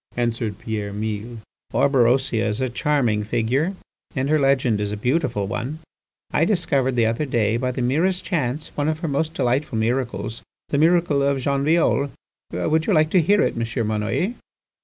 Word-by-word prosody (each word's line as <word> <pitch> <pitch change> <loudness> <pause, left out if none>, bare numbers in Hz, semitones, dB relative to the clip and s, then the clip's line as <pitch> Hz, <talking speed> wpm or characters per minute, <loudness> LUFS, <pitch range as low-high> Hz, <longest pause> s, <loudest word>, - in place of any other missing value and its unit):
answered 115 -4 -1
Pierre 105 -2 -4
Mille. 110 +3 -4 0.3
"Orberosia 125 -3 +2
is 105 +1 -2
a 130 -1 0
charming 120 -5 +1
figure 120 - 0 0.4
and 135 +1 -1
her 155 0 +3
legend 130 -6 +2
is 105 0 -2
a 105 - -3
beautiful 125 -3 0
one. 125 +9 -4 0.6
I 155 - +3
discovered 145 - +1
the 115 -2 +3
other 115 +6 0
day 115 -4 +1
by 125 +2 -1
the 125 0 -3
merest 170 +9 +1
chance, 150 -4 -2
one 145 0 -2
of 155 - -1
her 170 - -1
most 155 +3 -1
delightful 130 0 0
miracles, 115 -2 -2 0.3
the 140 - +1
miracle 165 -3 +3
of 140 0 +2
Jean 140 +1 0
Violle. 150 -2 +2 0.4
Would 155 - 0
you 210 - +3
like 155 -1 +3
to 185 - +5
hear 205 +6 +3
it, - - 0
M. 115 0 -2
Monnoyer?" 110 - -1
130 Hz, 175 wpm, -22 LUFS, 115-150 Hz, 0.6 s, to